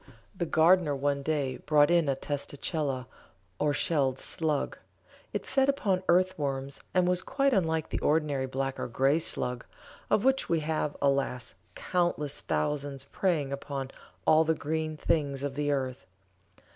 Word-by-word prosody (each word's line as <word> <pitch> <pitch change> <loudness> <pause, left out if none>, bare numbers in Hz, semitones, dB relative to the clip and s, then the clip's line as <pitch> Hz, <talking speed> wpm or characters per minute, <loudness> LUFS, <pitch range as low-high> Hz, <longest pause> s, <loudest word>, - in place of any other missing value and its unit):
The 175 -2 -2
gardener 160 -1 +4
one 140 0 0
day 140 -3 -1
brought 150 0 +3
in 170 -4 +3
a 135 - +2
testacella, 140 -1 -3 0.5
or 150 - +2
shelled 140 -3 +1
slug. 150 0 -1 0.5
It - - -3
fed 270 0 +2
upon 200 -10 +1
earth 185 +1 +3
worms 135 -1 -2
and 180 -1 +3
was 180 0 +2
quite 275 +4 +1
unlike 160 -6 +1
the - - -2
ordinary 145 -4 +1
black 135 +1 -3
or - - -2
grey 135 +6 +2
slug, 125 -6 -1 0.5
of 215 - +2
which 265 0 +2
we 165 -2 +2
have, 155 -1 -2
alas! 135 -3 0 0.2
countless 175 -5 -1
thousands 145 -2 -2
preying 150 -3 -1
upon 140 -1 -5 0.3
all 155 +1 +6
the 160 0 +1
green 155 +1 -2
things 140 -3 0
of 145 -1 -2
the 145 +1 -1
earth. 130 -2 -2
150 Hz, 150 wpm, -29 LUFS, 135-165 Hz, 0.5 s, all